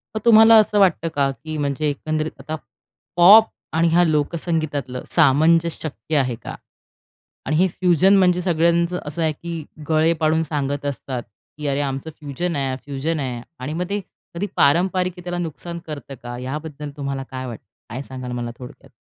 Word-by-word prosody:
मग 215 - -2
तुम्हाला 225 0 +8
असं 210 -1 +2
वाटतं 180 -4 +3
का, 140 -1 +2
की 155 +3 -7
म्हणजे 145 +1 -1
एकंदरीत 155 +2 -2
आता 155 - -5 0.6
पॉप 200 +6 +9 0.3
आणि 165 +1 +3
ह्या 175 +2 +4
लोकसंगीतातलं 155 -4 -1
सामंजस्य 165 +2 +4 0.2
शक्य 145 +3 -5
आहे 130 -4 +1
का? - - -6 0.9
आणि 155 - 0
हे 180 +4 +4
फ्युजन 185 +2 +3
म्हणजे 180 -2 +3
सगळ्यांचं 170 0 +2
असं 150 +3 -4
आहे, 160 -1 +2
की 165 0 -6 0.2
गळे 160 +1 +3
पाडून 160 +1 +2
सांगत 145 -2 -3
असतात, 130 -3 -4 0.3
की 150 -1 -4
"अरे, 140 0 0
आमचं 135 +2 -3
फ्युजन 155 +4 -3
आहे, 135 -2 -1
फ्युजन 145 +3 -2
आहे." 125 -4 -3 0.2
आणि 130 +4 -4
मग 175 +3 -2
ते 205 +1 -1 0.4
कधी 195 +5 -2
पारंपरिकतेला 180 +2 +1
नुकसान 170 0 -5
करतं 140 -2 -7
का? 120 0 -6
याबद्दल 150 +2 -6
तुम्हाला 140 -1 -3
काय 130 0 -5
वाटतं? 115 -3 -9 0.2
काय 120 +4 -5
सांगाल 130 -2 -7
मला 120 -1 -4
थोडक्यात? 125 -1 -12
155 Hz, 165 wpm, -21 LUFS, 140-170 Hz, 0.9 s, पॉप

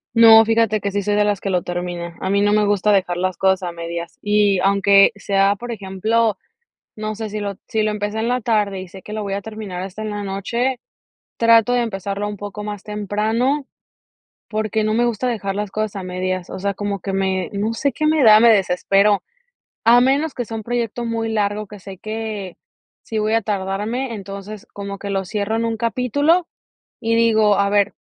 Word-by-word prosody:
No, 225 -1 +9
fíjate 225 -2 +2
que 200 - -2
sí 205 0 -1
soy 205 +1 0
de 210 - +3
las 205 -2 0
que 195 - -4
lo 180 -2 +1
termina. 175 -1 -5
A 190 - -3
mí 200 +1 +2
no 205 - +3
me 210 0 +3
gusta 205 0 +2
dejar 185 -3 +2
las 185 0 -2
cosas 190 -1 +2
a 175 - -3
medias. 170 0 -6
Y 205 -2 +2
aunque 200 +1 +5
sea, 200 0 +2
por 240 +3 -7
ejemplo, 215 +1 0 0.6
no 215 0 -4
sé, 220 -1 -4
si 215 - -4
lo 200 -1 -3
si 220 - 0
lo 215 - +1
empecé 210 +1 -3
en 225 - -1
la 250 +1 0
tarde, 210 -4 0
y 185 - -7
sé 190 +1 -12
que 210 - -10
lo 215 -1 -3
voy 195 - -4
a 200 - -1
terminar 215 -5 -6
hasta 195 +3 -7
en 215 - -3
la 205 0 -4
noche, 235 +7 -2 0.6
trato 230 0 +5
de 245 - +2
empezarlo 200 -2 -3
un 210 - -5
poco 205 +1 -7
más 205 -2 -5
temprano, 220 +7 -1 0.8
porque 215 0 -1
no 215 0 0
me 240 +2 +2
gusta 240 +1 -1
dejar 200 -4 -3
las 210 -1 -3
cosas 215 0 -3
a 195 - -5
medias. 185 0 -3
O 190 - -6
sea, 200 +1 -1
como 200 0 -3
que 195 +2 -5
me 190 -2 0
no 210 +3 -1
sé 275 +4 -1
qué 305 - -2
me 310 0 +3
da, 215 0 +8
me 235 - +7
desespero. 200 0 +3 0.6
A 235 +2 +7
menos 275 +5 +2
que 245 - -3
sea 225 0 -6
un 220 - -6
proyecto 240 0 -2
muy 230 -1 -2
largo, 210 -1 -1
que 210 - -10
sé 195 0 -10
que 215 -4 -5 0.5
sí 220 - -3
voy 215 +1 +1
a 225 - +2
tardarme, 210 +5 -2
entonces, 200 0 -8
como 200 -1 -6
que 200 0 -6
lo 195 -1 -1
cierro 210 +2 -2
en 230 - 0
un 230 -1 -1
capítulo, 280 +9 +1 0.5
y 230 0 0
digo: 220 -3 +4
"A 200 0 +3
ver, 205 -1 +2
210 Hz, 215 wpm, -20 LUFS, 195-225 Hz, 0.8 s, No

